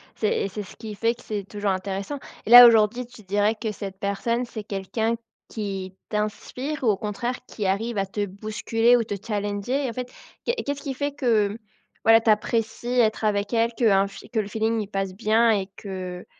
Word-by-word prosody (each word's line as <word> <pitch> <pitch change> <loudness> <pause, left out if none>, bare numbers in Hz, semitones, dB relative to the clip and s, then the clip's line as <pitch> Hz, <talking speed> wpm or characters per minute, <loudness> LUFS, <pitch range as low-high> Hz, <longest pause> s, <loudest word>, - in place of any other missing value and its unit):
c'est 210 -2 0
c'est 205 +2 -5
ce - - -13
qui 215 -2 -8
fait 230 +3 +1
que 240 - -17
c'est 210 -2 -3
toujours 205 -1 -1
intéressant. 195 +8 -3 0.3
Et - - -5
là, 245 0 +12
aujourd'hui, 225 +2 +3
tu 235 -2 -15
dirais 205 +3 +1
que 220 0 -3
cette 195 -2 -7
personne, 230 +5 -1
c'est 220 -3 -7
quelqu'un 215 +4 -2 0.3
qui 195 -3 -5
t'inspire 250 +7 -3
ou - - +2
au 210 -3 +3
contraire 230 +5 -3
qui 210 - -5
arrive 210 +4 0
à 195 - +1
te 205 +2 -2
bousculer 215 +4 +1
ou 235 - +1
te 205 - -4
challenger? 210 +5 -1
En - - -5
fait, 250 +1 -5 0.3
qu'est 475 - +1
ce - - -3
qu'est-ce 285 0 -3
qui 275 -3 -3
fait 285 +2 -2
que, 220 -7 +1 0.5
voilà, 225 0 +7
tu 225 - +1
apprécies 220 +1 0
être 220 -1 +2
avec 205 0 0
elle, 230 0 +2
qu'un 200 -5 +3 0.3
que 225 - 0
le 210 - -1
feeling, 220 +2 0
il 205 - -5
passe 195 -2 -3
bien 220 +4 +3
et 195 -3 0
que 185 -2 -6
215 Hz, 200 wpm, -24 LUFS, 200-235 Hz, 0.5 s, là